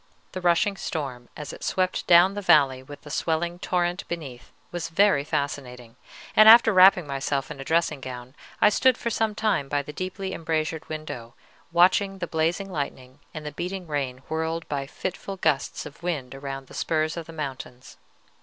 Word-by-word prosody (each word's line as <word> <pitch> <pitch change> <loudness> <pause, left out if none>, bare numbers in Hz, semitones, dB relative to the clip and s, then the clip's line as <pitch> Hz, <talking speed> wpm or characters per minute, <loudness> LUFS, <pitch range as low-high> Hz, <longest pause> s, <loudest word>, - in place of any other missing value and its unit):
The 185 - -6
rushing 180 +3 +2
storm, 130 -9 -5
as 150 - -7
it - - -10
swept 185 -1 -1
down 175 +2 +7
the 205 - -4
valley 140 -8 +4
with 145 +2 -12
the 150 - -10
swelling 170 +3 -1
torrent 175 0 -1
beneath, 140 -8 -7 0.2
was 170 -2 -4
very 195 -3 +3
fascinating, 125 -5 -4 0.4
and 215 0 +9
after 225 -1 +8
wrapping 185 -2 +7
myself 140 -1 -2
in 145 - -8
a - - -5
dressing 160 -2 0
gown 125 0 -8 0.3
I - - +6
stood 255 +4 +3
for 235 - -3
some 220 -1 0
time 200 -11 0
by 145 0 0
the 150 - -9
deeply 190 +3 -4
embrasured 160 -1 -2
window, 155 -7 -7 0.4
watching 185 +3 +3
the 180 - -3
blazing 170 +4 -1
lightning 135 -4 -5
and 155 -1 -8
the 150 - -4
beating 180 +5 -5
rain 135 -4 -3
whirled 160 +1 -3
by 140 -2 -3
fitful 195 +5 -5
gusts 140 -6 0
of 150 - -11
wind 155 -8 -3
around 135 0 -6
the - - -16
spurs 155 -1 -1
of 170 -2 -6
the - - -9
mountains. 130 -4 -7
160 Hz, 180 wpm, -25 LUFS, 140-180 Hz, 0.4 s, and